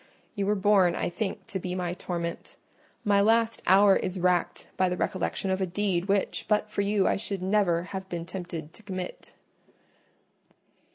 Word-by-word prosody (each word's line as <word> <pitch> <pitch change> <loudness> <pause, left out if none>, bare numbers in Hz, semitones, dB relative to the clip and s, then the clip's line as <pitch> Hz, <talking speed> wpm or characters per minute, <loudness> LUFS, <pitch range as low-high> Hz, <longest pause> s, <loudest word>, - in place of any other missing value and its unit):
You 200 -3 -2
were 210 - +3
born, 195 -3 +4
I - - -1
think, 195 +2 -4
to 190 - -4
be 180 0 -4
my 180 -1 -2
torment: 170 -2 -5 0.5
my 200 -1 +4
last 225 +2 +2
hour 195 +1 +7
is 185 0 -2
racked 180 -1 +1
by 185 -1 +2
the 180 - -2
recollection 190 +1 -1
of 190 +1 0
a 190 - +1
deed 185 -1 0
which, 200 0 0
but 210 0 +1
for 200 - 0
you, 200 -1 +2
I - - +2
should 195 -2 -3
never 190 -4 +2
have 190 +1 -7
been 170 -2 -4
tempted 170 -3 -6
to - - -11
commit." 185 -3 -7
190 Hz, 175 wpm, -27 LUFS, 180-205 Hz, 0.5 s, hour